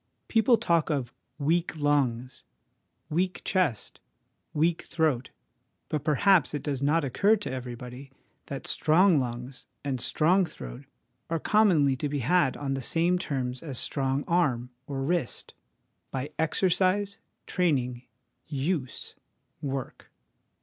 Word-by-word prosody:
People 230 +1 +4
talk 170 -5 +2
of 135 -6 -1 0.2
' - - -48
weak 170 -1 +1
lungs,' 130 -4 0 0.3
' - - -48
weak 180 +4 0
chest,' 175 - 0 0.3
* - - -48
weak 165 +2 +1
throat/ 155 -7 0 0.6
but 150 -2 -2
perhaps 160 0 +3
it 145 - -4
does 140 -3 -2
not 150 +3 +2
occur 200 - +3
to 205 -9 -5
everybody 125 +1 -7 0.4
that 140 -1 -6
strong 165 +1 +4
lungs 125 +1 -5 0.2
and 135 -4 -2
strong 180 +5 +3
throat 145 -5 -8 0.4
are 165 - +1
commonly 165 -10 +4
to 145 - -2
be 145 - -1
had 140 +2 +2
on 140 -1 -2
the 135 - -2
same 170 +7 +1
terms 130 -6 -3
as 140 -6 -5
a - - 0
strong 135 0 -1
arm 130 -8 +1 0.2
or 135 -2 -3
wrist 165 -3 -2 0.6
by 135 +3 -4
exercise, 190 +4 +2 0.3
training, 130 -9 0 0.5
use, 145 -2 -2 0.5
work. 135 -2 -5
145 Hz, 135 wpm, -28 LUFS, 130-175 Hz, 0.6 s, People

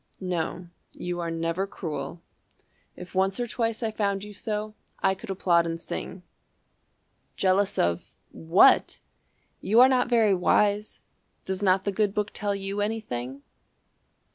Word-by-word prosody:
"No, 180 -1 -3 0.2
you 175 0 -4
are 170 -1 -2
never 165 +3 -2
cruel. 170 -2 -6 0.7
If 180 0 -11
once 190 +3 +1
or 245 - 0
twice 230 0 -2
I 220 - 0
found 200 -2 -1
you 210 0 -9
so, 210 0 -4 0.2
I 190 - +2
could 195 +3 -11
applaud 175 -3 +2
and 165 0 -3
sing. 180 +2 -6 1.1
Jealous 190 +1 +2
of 85 0 -1 0.2
What? 165 +4 +4 0.6
You 220 +4 +3
are 255 - +9
not 250 -2 +2
very 225 -4 +4
wise. 205 +3 +1 0.4
Does 190 +1 -2
not 190 -1 +3
the 200 - -1
good 205 0 0
Book 210 0 -1
tell 205 -1 -1
you 195 +1 -3
anything? 140 - -4
195 Hz, 140 wpm, -26 LUFS, 175-210 Hz, 1.1 s, are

